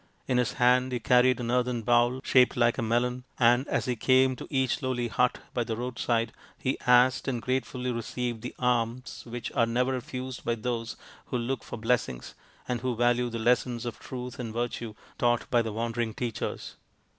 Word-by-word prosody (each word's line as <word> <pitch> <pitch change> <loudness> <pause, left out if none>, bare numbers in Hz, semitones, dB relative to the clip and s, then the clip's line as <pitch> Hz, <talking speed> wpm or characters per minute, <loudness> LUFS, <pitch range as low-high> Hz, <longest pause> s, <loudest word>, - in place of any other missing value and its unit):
In 125 -1 +2
his 125 - 0
hand 125 +1 +3
he 125 - -1
carried 125 +1 +4
an 120 -1 -2
earthen 125 -2 0
bowl 120 +2 +3
shaped 125 -1 +4
like 120 +1 +3
a - - +1
melon, 120 +2 0
and 120 +2 +4
as - - 0
he 125 - 0
came 130 +2 +3
to - - -9
each 130 -2 0
lowly 125 -3 -1
hut 125 +2 +2 0.2
by 120 - 0
the 115 -1 -4
roadside 120 -2 -1 0.2
he 130 - -2
asked 125 +2 +5
and 125 -3 -1
gratefully 130 +1 -2
received 120 0 -3
the 125 - -7
alms 120 0 -1
which 120 0 -5
are 115 - +2
never 125 +3 +1
refused 130 0 -5
by 120 - 0
those 115 0 -3 0.3
who 125 - -1
look 125 +2 -2
for - - -7
blessings, 115 - -1 0.3
and 120 -2 -2
who 125 -1 -1
value 120 +1 +2
the 115 - -4
lessons 120 +1 +1
of 120 - -5
Truth 125 -1 -7
and 115 -3 -4
Virtue 115 -1 -3 0.2
taught 120 -1 +2
by 120 - +4
the 115 -1 -3
wandering 115 0 -2
teachers. 120 -3 -4
120 Hz, 190 wpm, -28 LUFS, 115-125 Hz, 0.3 s, asked